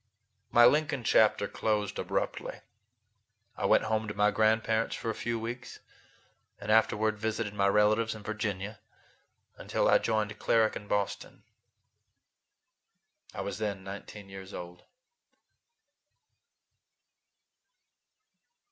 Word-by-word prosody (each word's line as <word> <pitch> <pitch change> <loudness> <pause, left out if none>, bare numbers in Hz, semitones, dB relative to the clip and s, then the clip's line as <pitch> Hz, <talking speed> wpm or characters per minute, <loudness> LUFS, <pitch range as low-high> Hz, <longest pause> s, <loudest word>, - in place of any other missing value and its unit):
My 120 0 +7
Lincoln 145 -1 +3
chapter 105 -2 +4
closed 105 -2 -1
abruptly. - - -3 0.9
I - - -1
went - - +4
home 110 0 -1
to 105 - -5
my 105 +1 +3
grandparents 110 +1 +1
for 115 - -3
a - - -4
few 115 +1 -3
weeks, 120 +2 -6 0.8
and 105 - -3
afterward 110 -1 +3
visited 110 -1 -2
my 100 -1 +2
relatives 105 +2 +3
in 105 - -10
Virginia 105 -1 -4 0.8
until - - 0
I - - +6
joined 110 -1 -1
Cleric 110 -1 +2
in 105 - -7
Boston. 100 -1 -3 1.9
I - - -3
was - - -4
then 100 -3 -3
nineteen 100 +1 -9
years 95 0 -9
old. 90 0 -9
110 Hz, 110 wpm, -30 LUFS, 105-110 Hz, 1.9 s, My